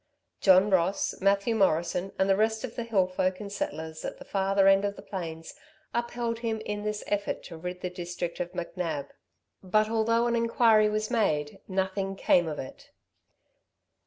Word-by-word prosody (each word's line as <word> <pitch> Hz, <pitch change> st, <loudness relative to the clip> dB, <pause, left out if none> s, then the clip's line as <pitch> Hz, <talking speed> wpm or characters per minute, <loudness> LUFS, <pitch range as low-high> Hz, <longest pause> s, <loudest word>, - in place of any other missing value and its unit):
John 190 Hz, +1 st, +5 dB
Ross, 185 Hz, +1 st, +2 dB
Mathew 200 Hz, +3 st, +2 dB
Morrison, 180 Hz, -2 st, +1 dB
and 190 Hz, -, +2 dB
the 195 Hz, -, +4 dB
rest 220 Hz, +2 st, +1 dB
of 245 Hz, -3 st, -5 dB
the -, -, -3 dB
hill 205 Hz, -5 st, +2 dB
folk 185 Hz, 0 st, -1 dB
and 205 Hz, -2 st, -7 dB
settlers 160 Hz, -4 st, -4 dB
at -, -, -5 dB
the -, -, -12 dB
farther 195 Hz, 0 st, +2 dB
end 195 Hz, 0 st, +6 dB
of 200 Hz, 0 st, -1 dB
the -, -, -11 dB
plains, 165 Hz, -4 st, -6 dB, 0.4 s
upheld 235 Hz, -1 st, -2 dB
him 225 Hz, -2 st, -2 dB
in 210 Hz, -1 st, -4 dB
this 210 Hz, 0 st, -3 dB
effort 205 Hz, 0 st, -2 dB
to 170 Hz, -, -9 dB
rid 180 Hz, +2 st, -6 dB
the 180 Hz, -, -2 dB
district 175 Hz, -1 st, -5 dB
of 180 Hz, 0 st, -3 dB
McNab; 170 Hz, -4 st, -3 dB, 0.5 s
but 215 Hz, +3 st, +1 dB
although 230 Hz, +1 st, +2 dB
an 235 Hz, 0 st, +1 dB
inquiry 230 Hz, -2 st, +4 dB
was 215 Hz, +2 st, -2 dB
made, 150 Hz, -11 st, 0 dB
nothing 190 Hz, 0 st, -1 dB
came 175 Hz, -3 st, +3 dB
of 150 Hz, -2 st, -4 dB
it. 130 Hz, -, -9 dB
195 Hz, 175 wpm, -28 LUFS, 180-215 Hz, 0.5 s, end